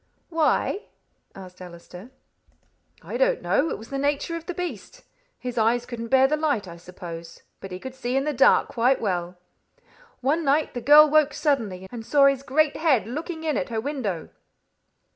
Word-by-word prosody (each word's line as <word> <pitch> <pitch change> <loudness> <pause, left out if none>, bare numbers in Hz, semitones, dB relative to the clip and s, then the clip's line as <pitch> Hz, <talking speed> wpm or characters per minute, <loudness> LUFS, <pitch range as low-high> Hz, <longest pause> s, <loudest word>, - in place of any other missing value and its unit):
"Why?" 330 +5 0 0.5
asked 185 -1 -12
Allister. 180 +4 -11 0.9
"I - - -5
don't - - +2
know. 320 - +1
It - - -3
was 225 +4 -13
the 275 - -2
nature 285 +4 -1
of 335 0 -8
the 360 - -3
beast. 360 +7 -6 0.3
His 245 -2 -4
eyes 235 +2 +2
couldn't 230 -2 -6
bear 265 +2 +5
the 300 - +1
light, 290 -10 -1
I 170 -1 -10
suppose; 170 -1 -10 0.2
but 195 - -9
he 180 - -5
could 260 +7 -8
see 255 -1 -3
in 270 - +1
the 300 +1 -1
dark 270 - +4
quite 250 +2 +2
well. 180 -3 -2 0.8
One 295 +6 +1
night 295 +2 +1
the 245 - -4
girl 295 +5 +8
woke 300 -1 +3
suddenly, 215 - -1
and 235 -2 -7
saw 280 +4 +4
his 275 -1 +3
great 290 +2 +1
head 305 -8 +2
looking 320 - -6
in 310 -3 0
at 180 - -3
her 225 -1 -2
window." 220 - -4
260 Hz, 180 wpm, -24 LUFS, 205-300 Hz, 0.9 s, girl